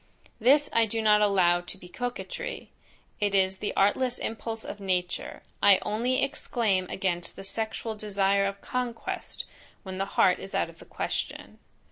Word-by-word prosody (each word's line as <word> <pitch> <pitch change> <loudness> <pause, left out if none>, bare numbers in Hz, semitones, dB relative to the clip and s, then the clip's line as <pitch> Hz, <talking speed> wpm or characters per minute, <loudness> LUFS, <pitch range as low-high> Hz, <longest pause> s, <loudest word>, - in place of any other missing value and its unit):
This 280 +6 +5
I 230 -1 +4
do 225 +2 -1
not 210 -1 +5
allow 185 -4 +4
to 175 - -9
be 180 - -12
coquetry, 245 +6 -5 0.5
it 205 -1 +1
is 190 0 +3
the 205 - -2
artless 245 +6 +3
impulse 225 0 -4
of 205 - -6
nature, 180 -2 -2 0.2
I 200 -2 +7
only 235 +5 +1
exclaim 220 -9 0
against 175 -2 -2
the - - -8
sexual 220 +2 -3
desire 200 -2 +1
of 200 0 -5
conquest, 250 -2 -4 0.4
when 190 -1 -6
the 195 - +1
heart - - +5
is - - -7
out - - +1
of - - -21
the - - -12
question. - - -4
205 Hz, 160 wpm, -28 LUFS, 190-230 Hz, 0.5 s, I